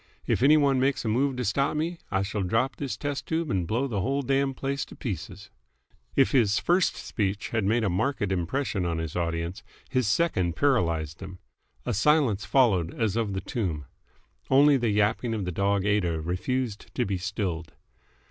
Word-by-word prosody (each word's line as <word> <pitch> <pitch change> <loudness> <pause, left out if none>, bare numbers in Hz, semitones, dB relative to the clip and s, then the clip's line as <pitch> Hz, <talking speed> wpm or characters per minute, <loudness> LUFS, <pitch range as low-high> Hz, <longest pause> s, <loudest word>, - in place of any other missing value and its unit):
If - - 0
any 145 +4 +6
one 140 -3 +3
makes 135 -1 +1
a - - 0
move 130 +5 +1
to 125 -1 -2
stop 140 +8 +1
me, 165 +2 -2
I 95 0 0
shall 105 +1 -3
drop 115 +8 0
this 140 -3 -4
test 145 -1 -4
tube 160 0 -1
and 90 -4 0
blow 120 +8 0
the 105 -7 -2
whole 140 +9 0
damned 135 0 0
place 140 0 -2
to - - -13
pieces." 100 - -6 0.6
If 135 - +4
his 115 -8 +3
first 180 +1 +2
speech 100 -2 -3
had 110 -4 0
made 115 +3 +2
a - - +2
marked 105 +9 0
impression 95 +3 -1
on 85 -2 -1
his 80 -2 -4
audience, 85 +2 -2 0.3
his 130 -4 +1
second 100 - +1
paralysed 85 - +1
them. 95 -1 -8 0.5
A - - -1
silence 125 -3 +2
followed 100 -11 +2
as 110 -3 +1
of 110 -4 -1
the 95 - -2
tomb. 85 - -3 0.6
Only 140 +2 +6
the 120 -4 +1
yapping 105 +3 +1
of 105 -4 -3
the 90 - -2
dog 100 +2 +1
Aida 95 -6 +1
refused 105 +7 -3
to 125 - +1
be 95 -2 -2
stilled. 90 -3 -3
105 Hz, 185 wpm, -27 LUFS, 95-135 Hz, 0.6 s, any